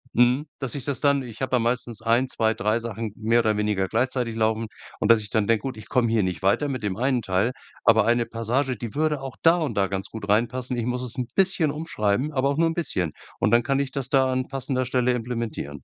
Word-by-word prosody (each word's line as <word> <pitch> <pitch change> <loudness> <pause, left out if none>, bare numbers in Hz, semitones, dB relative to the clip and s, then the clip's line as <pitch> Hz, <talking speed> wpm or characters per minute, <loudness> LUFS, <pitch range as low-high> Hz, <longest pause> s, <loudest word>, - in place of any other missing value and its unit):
mhm 125 +4 +3
dass 135 -2 -2
ich 135 -3 -3
das 140 -3 0
dann 140 -2 +3
ich 115 -1 -10
habe 130 - -1
da 125 - +4
meistens 120 -1 -1
1, 120 +3 +2
2, 110 -3 +1
3 110 +1 0
Sachen 115 -2 -5
mehr 115 +2 +2
oder 110 -2 +1
weniger 105 -2 0
gleichzeitig 120 0 0
laufen 110 0 0 0.3
und - - +4
dass 115 -1 +5
ich 105 - -5
dann 110 -2 +1
denke: 115 -2 +2
„Gut, 130 -4 -4
ich 110 - -11
komme 125 -3 +2
hier 115 -1 +2
nicht 90 0 -3
weiter 100 +9 +2
mit 130 -5 -4
dem 100 -3 -2
einen 130 +1 +1
Teil, 95 +6 +1 0.3
aber 110 -1 +5
eine 120 0 +2
Passage, 125 +4 -1
die 115 -1 -6
würde 150 -1 0
auch 135 -3 -7
da 165 +1 +6
und 150 -10 -2
da 95 -1 +3
ganz 95 0 -4
gut 110 -2 -8
reinpassen. 120 +4 0
Ich 115 - -1
muss 125 0 -2
es 125 0 -6
'n 125 -2 -2
bisschen 185 -5 +3
umschreiben, 145 -4 -1
aber 135 0 +1
auch 140 - -1
nur 165 0 +3
'n - - -2
bisschen. 95 - 0 0.3
Und - - +2
dann 120 0 +4
kann 135 +2 +1
ich 140 -2 -2
das 130 -2 -3
da 130 -1 +3
an 130 0 -1
passender 130 -1 -1
Stelle 125 0 +1
implementieren." 115 - -4
120 Hz, 250 wpm, -24 LUFS, 110-130 Hz, 0.3 s, da